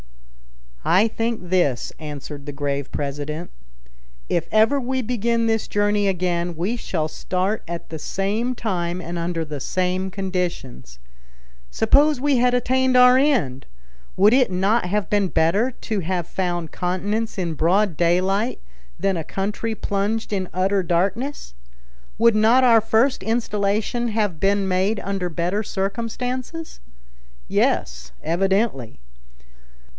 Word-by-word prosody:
"I 200 +5 +4
think 225 -5 -3
this," 175 -10 +1
answered 145 -1 -8
the - - -3
grave 140 -1 -3
president: 145 +4 -4 0.8
"If 170 - 0
ever 220 +6 +4
we 260 0 -2
begin 235 0 0
this 225 -1 0
journey 205 0 +1
again, 175 -2 -1
we 185 +9 -1
shall 165 -9 -2
start 185 +6 -2
at 170 0 -6
the 160 - -6
same 215 +10 -1
time 180 -6 -2
and 170 0 -5
under 170 -1 -2
the 150 -2 -6
same 185 +5 -1
conditions. 180 - -4 0.7
Suppose 285 - +3
we 285 0 +2
had 250 +1 +3
attained 260 +1 +2
our 250 0 +8
end, 255 - +1 0.5
would 205 +4 +6
it 255 -3 +4
not 195 +4 +1
have 200 0 -1
been 205 -2 +1
better 185 +9 +2
to 220 -4 -4
have 180 -1 -2
found 175 -3 -3
continents 200 +6 -2
in 175 -3 -1
broad 175 +4 +2
daylight 185 +7 +1 0.4
than 195 -2 +1
a 165 - -3
country 210 +6 -3
plunged 210 +2 -2
in 190 -2 -2
utter 190 +2 +1
darkness? 190 - -1 0.6
Would 230 +1 +4
not 225 +4 +5
our 230 -3 +6
first 225 +4 +2
installation 215 +1 0
have 210 -7 -1
been 195 +1 +2
made 190 +3 +1
under 195 -2 -2
better 175 +5 -1
circumstances? 240 - -4 0.7
Yes, - - 0
evidently. 190 - 0
195 Hz, 130 wpm, -22 LUFS, 175-225 Hz, 0.8 s, our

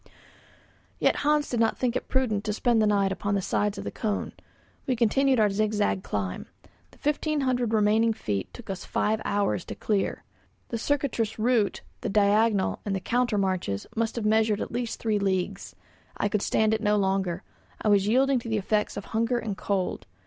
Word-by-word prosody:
Yet - - +2
Hans 295 0 +2
did 240 - -2
not 225 -1 +2
think 250 -1 0
it - - -2
prudent 225 -6 0
to 210 - -1
spend 230 +1 +2
the 215 - +3
night 200 -2 +2
upon 200 +1 -1
the - - +2
sides 205 +2 0
of - - -5
the - - -4
cone. 210 -3 -2 0.6
We 260 - +2
continued 255 +3 +3
our 210 -2 +4
zigzag 205 - 0
climb. 95 -2 -4 0.4
The - - -21
fifteen 300 0 0
hundred 250 -3 0
remaining 220 +1 +3
feet 100 - -3
took 235 -5 -8
us 190 - -6
five 215 +1 0
hours 200 -3 0
to - - -6
clear; 205 -3 -1 0.5
the 230 - -3
circuitous 250 -5 -1
route, 220 -3 +1 0.2
the 235 - -3
diagonal 205 0 +2
and 200 -2 -2
the - - -1
counter 240 +2 0
marches, 185 - -1
must 230 0 -1
have 230 -3 -3
measured 215 -1 +3
at - - -4
least 240 -1 -3
three 215 -2 0
leagues. 195 0 -2 0.4
I 205 - 0
could 205 0 0
stand 220 +1 +2
it 220 - 0
no 210 -1 +2
longer. 190 -2 0 0.4
I - - -2
was 200 -1 +4
yielding 260 +3 +3
to 230 - -8
the 220 - +1
effects 210 +1 0
of 200 - -5
hunger 230 +2 0
and 220 -4 -3
cold. 190 -1 -2
215 Hz, 190 wpm, -27 LUFS, 200-235 Hz, 0.6 s, our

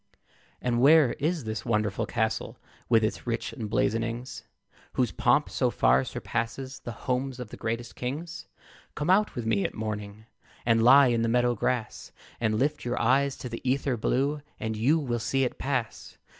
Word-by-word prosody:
And 120 -1 +1
where 145 -2 +6
is 160 +1 0
this 110 -1 -4
wonderful 105 -4 0
castle, 110 -2 -2 0.3
With 115 -2 +4
its 110 - -2
rich 115 -1 -2
emblazonings, 115 +2 -2 0.5
Whose 125 -6 +1
pomp - - +2
so - - 0
far 65 +2 +3
surpasses 130 - -4
The 120 - -7
homes 130 0 -1
of 125 -4 -6
the - - -9
greatest 115 +1 -4
kings? 150 +7 -5 0.5
Come 150 +4 0
out 210 +3 +3
with 120 - -4
me 105 -3 +1
at - - -3
morning 105 -1 -5 0.4
And 115 -1 +3
lie 130 +3 +7
in 115 -1 +1
the 115 - +1
meadow 120 +1 +3
grass, 120 0 -2 0.3
And 110 -2 +1
lift 145 +5 0
your 120 0 -2
eyes 140 +1 +2
to - - -6
the 115 -1 -6
ether 135 0 0
blue, 140 +6 0 0.2
And 110 0 -3
you 130 +9 +3
will 125 -6 -2
see 135 +4 0
it 125 - -2
pass. 130 -5 -3
120 Hz, 170 wpm, -27 LUFS, 110-135 Hz, 0.5 s, lie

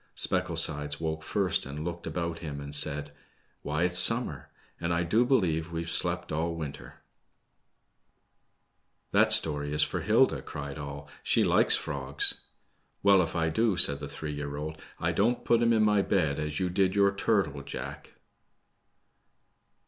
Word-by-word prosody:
Specklesides 75 0 0
awoke 80 -1 -3
first, 95 +2 0
and 75 +3 -6
looked 85 0 -6
about 85 -1 -4
him 75 -4 -6
and 70 0 -8
said, 75 0 +1 0.5
Why, 75 +3 -2
it's 90 0 +2
summer, 115 - +4 0.3
and 85 0 -2
I 85 0 +1
do 105 +8 +2
believe 85 - 0
we've 85 0 -4
slept - - -1
all 85 +2 -2
winter! 75 -4 -8 1.0
" - - -47
That - - +3
story 75 -2 +2
is 75 0 +2
for - - -3
Hilda/' - - +2
cried 70 +1 -7
all; 70 0 -8
she - - +2
likes - - +4
frogs." - - 0 0.7
Wellj 100 -2 +6
if 80 - -9
I 80 -1 +1
do/' 110 +1 +1
said 70 -5 +6
three 75 -1 -6
year 75 0 -5
old^ 75 +2 -6 0.2
I - - 0
don't 120 +4 0
put 115 -1 +3
'em 115 0 +3
in 110 -2 +3
my 105 -1 +3
bed, 80 -8 0
as 75 0 -3
you 90 -1 -1
did 95 +1 +1
your 100 -1 +4
turtle, 100 - 0
Jack." - - -8
80 Hz, 155 wpm, -28 LUFS, 75-95 Hz, 1.0 s, Wellj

